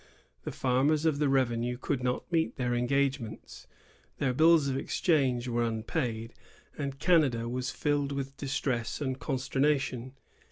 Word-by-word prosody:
The - - -3
farmers 140 +5 +1
of 155 -3 +2
the 150 -2 +2
revenue 125 -2 +1
could 135 0 -2
not 125 +7 -2
meet 165 -1 +1
their 125 -1 -1
engage 140 +3 +1
mente. 115 -3 -10 0.5
Their 130 -2 0
bills 160 +1 +5
of 135 - -1
exchange 135 -4 +1
were 120 -1 0
unpaid, 115 0 -2 0.4
and 140 -2 -4
Canada 135 -9 +2
was 125 +1 -2
filled 145 0 0
with 135 -1 -4
distress 130 -4 -2
and 130 -2 -2
consternation. 135 -2 -1
135 Hz, 145 wpm, -29 LUFS, 125-145 Hz, 0.5 s, bills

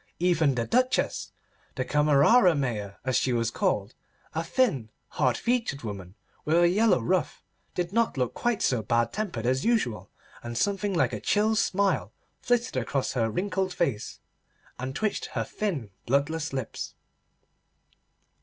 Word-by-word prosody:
Even 165 -6 +2
the 115 -1 -1
Duchess—the 250 - -2
Camerera 150 - +5
Mayor 110 -8 -2
as 130 -1 +2
she 130 - +1
was 115 -1 0
called—a 115 +12 -3
thin, 170 - +1 0.2
hard 125 -2 +1
featured 230 - -1
woman 100 -4 -7 0.3
with 160 +2 +2
a 175 0 +6
yellow 210 - +3
ruff, 180 +11 -1 0.3
did 175 +1 -2
not 230 -8 +1
look 125 -2 0
quite 240 -3 -1
so 125 -4 +2
bad 115 +2 +1
tempered 175 - -3
as 130 +2 +1
usual, 215 - 0 0.3
and 120 0 -5
something 200 - 0
like 130 -7 +2
a 105 - -3
chill 215 +2 +2
smile 200 -2 +1 0.3
flitted 240 - 0
across 130 +2 -1
her 115 -3 +1
wrinkled 190 - -1
face 130 -11 -2 0.6
and 130 +1 -4
twitched 215 -1 -1
her - - -2
thin 155 - -3 0.2
bloodless 150 +5 0
lips. 130 -4 -5
150 Hz, 140 wpm, -27 LUFS, 120-200 Hz, 0.6 s, a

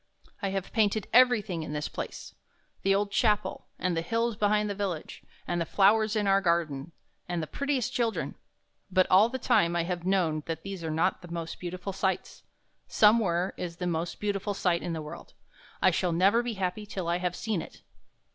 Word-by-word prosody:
I 200 - 0
have 195 -1 -4
painted 215 -1 +2
everything 220 -8 +4
in 155 -1 -5
this 150 0 -2
place, - - -7 0.3
— - - -40
the 195 0 +3
old 200 0 0
chapel, 210 -2 +1
and 180 -1 -1
the 165 - 0
hills 230 +5 0
behind 210 0 +2
the 205 - -2
village, 190 -6 -4 0.3
and 175 - -1
the - - +3
flowers 215 +2 +4
in 210 -1 +1
our 195 0 +4
garden, 170 -4 0 0.4
and 175 -1 -1
the 160 - -2
prettiest 275 - -1
children. 230 -2 -1 0.6
But 185 0 +4
all 200 +5 +7
the 260 - -3
time 170 -8 +2
I 170 - +1
have 175 0 -3
known 175 -5 +1
that 165 -1 -4
these 195 -3 -6
are 160 - -2
not 160 +4 +1
the 175 - -10
most 165 -1 -5
beautiful 180 +2 -5
sights. 190 0 -2 0.5
Somewhere 200 -5 +3
is 170 -2 -5
the 180 - -3
most 170 0 -2
beauti 205 -2 -1
ful 205 0 -3
sight 175 -3 +1
in 170 - -3
the 160 -1 -4
world. 150 - -10 0.5
I - - +6
shall 180 -2 0
never 195 +7 +4
be 240 -1 -3
happy 195 +1 -3
till 190 -4 -4
I 170 +1 +1
have 180 -1 -1
seen 215 -5 -2
it." - - -12
190 Hz, 205 wpm, -28 LUFS, 170-210 Hz, 0.6 s, all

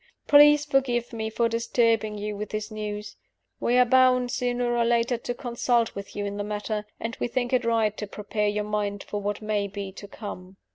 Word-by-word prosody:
Please 295 0 +7
forgive 250 -4 0
me 220 -1 -3
for 230 +1 +1
disturbing 230 -2 +1
you 210 0 -4
with 210 +1 -5
this 215 +1 -4
news. 210 -1 -5 0.4
We 245 - +2
are 250 - +6
bound, 255 0 +4
sooner 245 -1 0
or 235 - +2
later, 235 +1 +2
to 245 - -4
consult 240 -1 0
with 200 0 -8
you 205 - -2
in 200 0 -4
the 205 - -2
matter; 210 0 -3
and 230 0 -4
we - - 0
think 245 +1 -2
it 250 -1 +3
right 225 -2 +2
to 210 - -4
prepare 210 +1 -2
your 210 0 0
mind 205 -1 -2
for 205 - -4
what 205 +1 -3
may 210 -1 0
be 200 -1 -6
to 200 +1 -10
come." 190 -2 -9
220 Hz, 205 wpm, -26 LUFS, 210-240 Hz, 0.4 s, Please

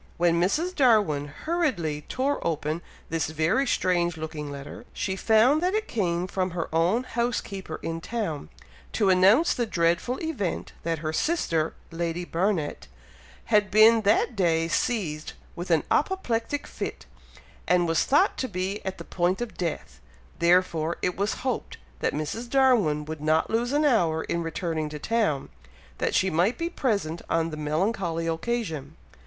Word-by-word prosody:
When 170 0 +3
Mrs. 315 - +1
Darwin 210 - +3
hurriedly 175 - -2
tore 275 +3 0
open 155 +1 -2 0.3
this 165 -1 0
very 160 - +1
strange 175 -5 +1
looking 155 -2 -5
letter, 140 +11 -8
she 195 -4 -2
found 225 +9 +4
that 365 +3 +1
it 435 0 -1
came 175 -5 0
from 185 0 -1
her 170 -2 -4
own 175 +9 +2
housekeeper 225 -9 -3
in 165 0 -3
town, 175 - -3 0.4
to 200 -3 +3
announce 195 - +5
the 240 -2 -1
dreadful 175 +7 +1
event 265 - -3
that 165 0 -1
her 155 - -1
sister, 165 - 0 0.2
Lady 170 +1 -3
Barnet, 170 - -1 0.7
had 205 -1 +4
been 220 +2 +6
that 215 +3 +2
day 165 -4 +2
seized 170 -5 -1 0.2
with 175 +1 -6
an 165 -3 +3
apoplectic 290 -6 0
fit, - - -6 0.6
and 175 -1 +3
was 165 0 +2
thought 300 +9 +3
to 260 - -1
be 190 0 -3
at 190 -1 -4
the - - -7
point 180 +1 0
of 240 -2 -5
death, 170 - -4 0.4
therefore 170 -2 +2
it 180 - 0
was 200 +2 0
hoped 260 - -2 0.2
that - - 0
Mrs. 165 +11 -4
Darwin 235 - +3
would 155 0 -6
not 155 +1 +2
lose 235 +2 0
an 295 +1 +2
hour 170 - +2
in 170 - -2
returning 165 -1 -2
to 150 - -6
town, 200 -5 0 0.5
that - - 0
she 190 0 +2
might 175 +9 +2
be 335 0 -2
present 200 - -1
on 165 0 +1
the - - -4
melancholy 165 +2 -1
occasion. 165 - -3
180 Hz, 155 wpm, -26 LUFS, 160-230 Hz, 0.7 s, been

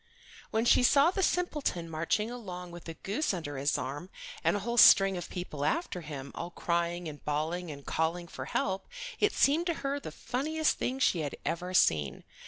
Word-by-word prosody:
When 220 +1 0
she 240 - +6
saw 280 +6 +5
the 385 - -1
simpleton 300 - 0
marching 165 +8 -1
along 180 -7 -7
with 170 -1 -9
a 165 - -6
goose 205 - -1
under 145 -5 -5
his 140 +2 +1
arm 140 +8 -5 0.3
and - - +3
a 205 - -2
whole 235 +3 -3
string 195 -2 +8
of 175 -1 -5
people 175 -6 -5
after 265 - -1
him, 140 -3 -7
all 170 - -5
crying 170 0 -1
and 150 -2 -8
bawling 160 +4 -2
and 140 -2 -9
calling 170 +2 -1
for 130 -5 -7
help, 190 +6 -2 0.3
it 415 - +3
seemed 315 +5 +3
to 340 - 0
her 280 +1 0
the - - -7
funniest 310 +5 -1
thing 255 - -1
she 220 -9 +2
had 145 -3 -3
ever 180 +2 -2
seen. 75 - +2
180 Hz, 190 wpm, -30 LUFS, 160-245 Hz, 0.3 s, string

